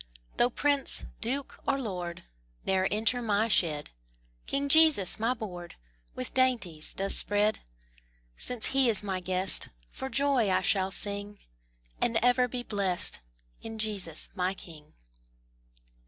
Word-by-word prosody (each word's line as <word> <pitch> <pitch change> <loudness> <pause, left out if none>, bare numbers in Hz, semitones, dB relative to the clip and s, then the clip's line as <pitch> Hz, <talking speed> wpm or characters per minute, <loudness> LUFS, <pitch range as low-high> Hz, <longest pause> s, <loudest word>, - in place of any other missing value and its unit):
Though 240 - +4
prince, 285 +2 +2
duke, 265 +4 -3
or 275 0 +1
lord, 180 -8 -5 0.4
Ne'er 190 0 +2
enter 225 +4 +1
my 215 -1 +1
shed, 155 -8 +1 0.6
King 280 +1 -1
Jesus 300 - +5
my 235 +3 +1
board 180 -6 -8 0.4
With 125 - -5
dainties 230 -12 0
does 195 +1 +3
spread. 205 +1 +1 0.8
Since 245 -3 -1
He 270 -2 +4
is 210 -2 +1
my 190 -2 -2
guest, 185 +1 -2 0.2
For 265 - -6
joy 275 -6 +2
I 185 - +2
shall 190 -2 +2
sing, 205 +1 -1 0.6
And 235 -1 +2
ever 250 0 +4
be 245 0 -4
blest 195 - -1 0.4
In 225 0 -7
Jesus 200 -7 -1
my 185 0 -1
King. 155 -5 -11
210 Hz, 130 wpm, -29 LUFS, 185-250 Hz, 0.8 s, Jesus